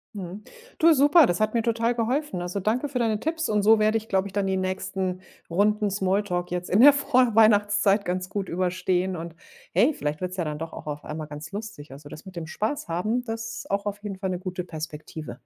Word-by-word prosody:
Mhm, 195 +2 -7 0.3
du 330 0 +6
super, 295 +3 +6
das 175 -4 0
hat 215 +1 0
mir 230 - +2
total 230 +1 +1
geholfen. 245 - -1
Also, 180 +3 -3
danke 230 +9 0
für 265 -2 -3
deine 220 -3 +1
Tipps. 325 +3 -2
Und 210 -1 +1
so 220 +1 +6
werde 215 +1 +3
ich, 220 0 -7
glaube 190 0 +1
ich, 195 - -12
dann 200 -1 0
die 190 0 0
nächsten 185 0 -2 0.3
Runden 210 +4 +2
Smalltalk 190 -2 -1
jetzt 180 0 -3
in 200 +6 +4
der 290 +1 +9
Vorweihnachtszeit 220 -7 +3
ganz 180 +1 -2
gut 195 -2 -3
überstehen 185 +1 0
und 165 0 -6 0.4
hey, - - +4
vielleicht 150 - -4
wird's 185 +1 -4
ja 170 - -1
dann 150 0 -4
doch 165 0 -5
auch - - -9
auf 150 -1 -5
einmal 155 0 -5
ganz 150 +4 -9
lustig. 200 -9 -7
Also, 145 +2 -11
das 155 - -11
mit 185 - -11
dem 165 -2 -5
Spaß 215 - -3
haben, 215 +9 -1
das 225 -1 -5
auch 200 +1 -1
auf 205 +1 -5
jeden 195 -2 -6
Fall 190 -1 -2
'ne 180 - -2
gute 185 -1 -4
Perspektive. 155 -1 -7
195 Hz, 220 wpm, -25 LUFS, 180-220 Hz, 0.4 s, der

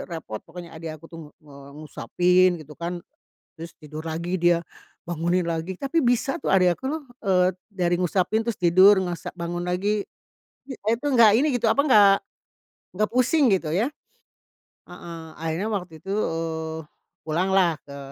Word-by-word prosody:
repot 160 -11 -6
pokoknya 170 0 -11
adik 160 -1 -7
aku 155 - -21
tuh 165 - -9
ng - - -21
nge 145 -2 -14 0.2
ngusapin 180 +5 +2
gitu 150 0 -12
kan. 175 +1 -5 0.5
Terus 165 0 -8
tidur 155 +1 -9
lagi 170 +3 -2
dia, 175 -1 +3 0.4
bangunin 175 +1 0
lagi 170 +3 -3
tapi 280 - 0
bisa 245 0 +1
tuh - - -4
adik 185 -2 +5
aku - - -16
loh, 310 +2 -3 0.2
eee, 185 -3 +2 0.2
dari 180 -4 -1
ngusapin 185 +5 0
terus 230 - -1
tidur 185 +4 +6
ngusa 175 -2 -5
bangun 175 0 -4
lagi. 200 +3 0 0.7
I - - -4
a - - -8
itu 235 +5 -5
nggak 235 -5 +6
ini 305 - +2
gitu, 235 - -2
apa 280 - +3
ga 210 -5 +7 0.9
ga 215 +3 +2
pusing 255 +1 +3
gitu 180 -5 +1
ya. 230 +10 +1 1.0
Heeh, 165 -1 -9
akhirnya 165 +6 -3
waktu 180 -5 -4
itu, 190 - -10
eee, 160 -5 -2 0.4
pulanglah 175 +1 +1
ke 140 0 -10
180 Hz, 160 wpm, -24 LUFS, 165-205 Hz, 1.0 s, ga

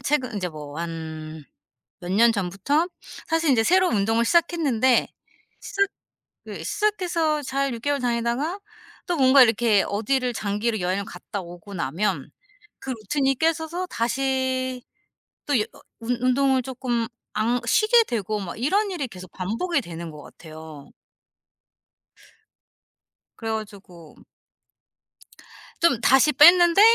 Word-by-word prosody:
최근 255 -2 -1
인제 185 -3 -2
뭐 150 -1 -9
한 160 -2 -6 0.6
몇 180 0 -5
년 230 +3 +5
전부터 205 - 0 0.4
사실 325 -2 +1
이제 225 -4 +3
새로운 365 -3 +3
운동을 225 +3 +1
시작했는데 290 -6 +2 0.5
시작 395 -1 0 0.6
그 - - -7
시작해서 360 -7 0
잘 275 -1 -1
6 230 - -9
개월 285 -1 0
다니다가 245 +8 -1 0.5
또 350 -2 -1
뭔가 265 0 +7
이렇게 225 -3 +3
어디를 250 +4 -1
장기로 215 +1 -2
여행을 185 +3 -1
갔다 190 +2 -7
오고 175 +3 -11
나면 165 +6 -2 0.5
그 - - -11
루틴이 270 +4 0
깨져서 325 +4 -1
다시 260 +1 -1 0.7
또 285 -4 +2
여 - - +2 0.4
운 240 +2 -1
운동을 260 +1 +2
쪼끔 245 -2 -3 0.3
안 235 +3 +1
쉬게 435 - +4
되고 215 - -3
막 185 -4 -6
이런 395 - +1
일이 295 -7 -3
계속 185 -5 -12
반복이 230 - -2
되는 170 -3 -8
것 150 -1 -11
같아요. 155 -3 -12 2.5
그래 225 -1 -4
가지고 195 -7 -8 1.6
좀 335 -9 +3
다시 270 +3 +5
뺐는데 345 +5 +7
240 Hz, 245 characters per minute, -24 LUFS, 200-290 Hz, 2.5 s, 뭔가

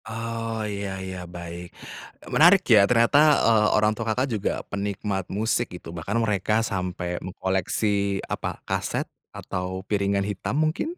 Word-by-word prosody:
Oh, 115 -1 -4
ya 100 -2 -4
ya, 95 -2 -6
baik, 85 0 -8 0.6
menarik 175 +4 +7
ya 100 -2 +6
ternyata, 120 +4 +4 0.3
eee, 110 -2 +4
orang 105 0 +3
tua 115 +1 -5
Kakak 125 +4 +1
juga 105 -2 0
penikmat 100 -1 -3
musik 110 +4 0
gitu, 80 - -10
bahkan 90 +6 -3
mereka 110 0 +1
sampai 90 -3 -3
mengkoleksi, 100 +2 -1
apa, - - -4
kaset - - -1 0.3
atau 95 +1 -4
piringan 100 -1 0
hitam 105 +6 -3
mungkin? 160 - 0
100 Hz, 135 wpm, -25 LUFS, 95-115 Hz, 0.6 s, menarik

